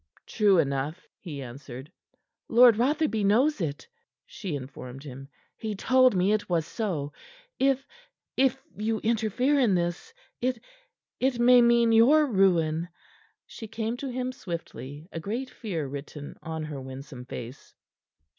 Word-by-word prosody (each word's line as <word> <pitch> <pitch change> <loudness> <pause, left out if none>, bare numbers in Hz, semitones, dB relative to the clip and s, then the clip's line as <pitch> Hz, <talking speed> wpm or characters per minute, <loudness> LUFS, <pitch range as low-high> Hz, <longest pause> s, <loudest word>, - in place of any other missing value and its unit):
"True 205 -3 +3
enough," 140 +3 -1
he 145 -7 -7
answered. 130 +3 -9 0.6
"Lord 240 0 +7
Rotherby 265 -1 +1
knows 235 +6 +3
it," 145 -3 -3 0.4
she 200 - -5
informed 130 -1 -8
him. 135 -1 -9 0.3
"He 215 -2 -4
told 255 +2 +4
me 185 +2 +3
it 215 -2 -1
was 165 -3 +1
so. 165 -11 -3 0.5
If 270 0 +2 0.5
if 265 0 +3 0.2
you 220 +1 -1
interfere 230 +5 +1
in 230 -8 +3
this, 175 - -2 0.3
it 250 0 0 0.6
it 260 -1 +1
may 245 +1 +7
mean 235 -1 +4
your 265 +8 +6
ruin." 175 - +2 0.6
She 225 - -9
came 225 +1 -3
to 275 +1 -5
him 255 0 -2
swiftly, 165 - -7
a 165 - -5
great 230 +10 -4
fear 175 -10 -4
written 145 +1 -7
or 160 0 -5
her 150 -3 -6
winsome 130 -1 -9
face. 125 +1 -9
200 Hz, 135 wpm, -27 LUFS, 150-240 Hz, 0.6 s, Lord